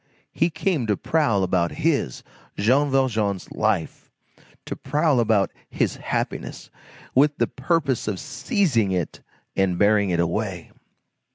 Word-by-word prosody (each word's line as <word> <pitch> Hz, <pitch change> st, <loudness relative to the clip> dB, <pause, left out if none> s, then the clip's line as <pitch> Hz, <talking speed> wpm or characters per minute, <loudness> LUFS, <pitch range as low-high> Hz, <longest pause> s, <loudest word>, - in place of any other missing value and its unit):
He 165 Hz, -, +1 dB
came 160 Hz, -, -1 dB
to 105 Hz, -, +1 dB
prowl 130 Hz, -12 st, +1 dB
about 90 Hz, -2 st, +1 dB
his, 150 Hz, -, 0 dB, 0.3 s
Jean 130 Hz, +8 st, +3 dB
Valjean's, 110 Hz, -8 st, 0 dB
life! -, -, -1 dB, 0.6 s
to -, -, -4 dB
prowl 145 Hz, 0 st, +1 dB
about 110 Hz, -4 st, +2 dB, 0.2 s
his -, -, -1 dB
happiness, -, -, -4 dB, 0.4 s
with 145 Hz, +2 st, +4 dB
the -, -, +2 dB
purpose 140 Hz, -4 st, -1 dB
of 100 Hz, -4 st, -2 dB
seizing 130 Hz, -, 0 dB
it 90 Hz, -4 st, -2 dB, 0.3 s
and 95 Hz, -2 st, +1 dB
bearing 100 Hz, 0 st, +3 dB
it 85 Hz, -1 st, 0 dB
away! 90 Hz, 0 st, -2 dB
115 Hz, 125 wpm, -23 LUFS, 100-145 Hz, 0.6 s, with